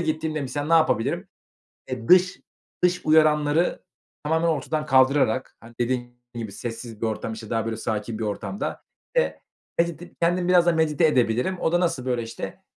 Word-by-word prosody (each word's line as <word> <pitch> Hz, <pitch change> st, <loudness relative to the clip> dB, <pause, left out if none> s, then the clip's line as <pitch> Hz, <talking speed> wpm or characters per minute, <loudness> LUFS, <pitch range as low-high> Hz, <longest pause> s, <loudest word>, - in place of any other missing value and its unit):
gittiğimde 155 Hz, -1 st, -1 dB
misal 145 Hz, +2 st, -3 dB
ne 165 Hz, -, -1 dB
yapabilirim? 155 Hz, -8 st, +2 dB, 0.6 s
Eee, 120 Hz, -3 st, -5 dB
dış 185 Hz, 0 st, +5 dB, 0.4 s
dış 180 Hz, 0 st, +3 dB
uyaranları 155 Hz, +1 st, +3 dB, 0.4 s
tamamen 160 Hz, +2 st, +1 dB
ortadan 155 Hz, 0 st, -1 dB
kaldırarak, 130 Hz, -2 st, +3 dB
hani, 115 Hz, +1 st, -15 dB
dediğim 120 Hz, 0 st, -1 dB, 0.2 s
gibi 110 Hz, -4 st, -5 dB
sessiz 115 Hz, 0 st, -7 dB
bir 115 Hz, -, 0 dB
ortam, 110 Hz, 0 st, -3 dB
işte, 110 Hz, -1 st, -9 dB
daha, 115 Hz, -2 st, 0 dB
böyle, 115 Hz, -1 st, -3 dB
sakin 110 Hz, 0 st, -3 dB
bir 110 Hz, -, -2 dB
ortamda 105 Hz, -, -4 dB, 0.3 s
ve -, -, +1 dB, 0.4 s
medite 170 Hz, 0 st, -1 dB
kendimi 175 Hz, +1 st, +2 dB
biraz 175 Hz, -1 st, +5 dB
da 175 Hz, -, +5 dB
medite 160 Hz, 0 st, +2 dB
edebilirim." 125 Hz, +6 st, +1 dB
O 160 Hz, -, 0 dB
da 175 Hz, -, +3 dB
nasıl, 155 Hz, -8 st, 0 dB
böyle, 120 Hz, -2 st, 0 dB
işte, 115 Hz, 0 st, -7 dB
145 Hz, 165 wpm, -24 LUFS, 115-165 Hz, 0.6 s, dış